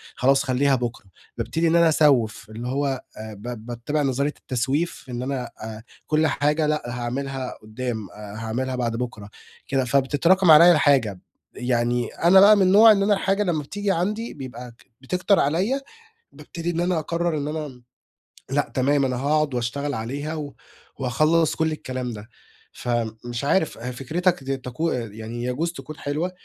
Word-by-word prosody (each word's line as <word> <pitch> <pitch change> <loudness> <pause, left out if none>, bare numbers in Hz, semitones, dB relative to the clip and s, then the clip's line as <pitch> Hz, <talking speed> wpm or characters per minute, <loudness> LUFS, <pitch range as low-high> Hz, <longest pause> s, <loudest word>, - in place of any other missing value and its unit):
خلاص 135 +2 +3
خلّيها 135 +1 +2
بُكرة." 120 -4 -4 0.3
بابتدي 165 +1 0
إن 165 - +3
أنا 170 -1 +5
أسوّف، 135 -10 +3
اللي 115 +3 -6
هو 135 0 -1 0.2
آآ 110 0 -7
ب 110 +2 -8
باتّبع 120 +6 -2
نظرية 140 +1 0
التسويف، 135 +6 -2
إن 120 -1 -4
أنا 130 -2 -3
آآ، 110 0 -7 0.2
كلّ 155 +1 +2
حاجة 150 +2 +1
لأ 150 0 0
هاعملها 125 +2 -4
قدّام، 110 -1 -5
آآ، 105 -1 -10
هاعملها 120 +4 -3
بعد 120 -2 -1
بُكرة، 115 -4 -5 0.4
كده، 135 -2 0
فبتتراكم 145 +7 +3
عليَّ 170 +3 +9
الحاجة. 135 - +3 0.3
يعني 120 -1 0
أنا 180 +3 +4
بقى 205 +2 +8
من 200 - +2
النوع 205 +4 +7
إن 200 -2 +3
أنا 205 +1 +3
الحاجة 195 +1 +1
لمّا 165 -6 -1
بتيجي 205 +7 -2
عندي 210 +6 -2
بيبقى 125 -3 -8
ك 115 - -23 0.2
بتكتر 180 +8 +1
عليَّ، 190 - +1 0.5
بابتدي 170 0 -6
إن 170 - -3
أنا 175 -1 +1
أقرّر 170 +1 -1
إن 145 0 -3
أنا 155 0 -3
م 125 -3 -14 0.7
لأ 145 +1 0
تمام، 140 +2 +2
أنا 130 -1 -1
هاقعد 145 +2 +1
واشتغل 135 +4 -2
عليها 140 +7 -4
و 145 -3 -6 0.5
وهاخلّص 155 +5 +2
كلّ 160 -1 0
الكلام 130 -5 -4
ده. 105 +2 -10 0.4
فمش 120 0 -3
عارف 160 +3 +1
ه 120 +3 -5
فكْرِتك 165 +6 -1
دي 135 0 -2
تكو 130 +6 -3
يعني 115 0 -5
يجوز 135 +7 -1
تكون 150 +2 -9
حلوة، 155 +6 -2
135 Hz, 165 wpm, -23 LUFS, 120-160 Hz, 0.7 s, عليَّ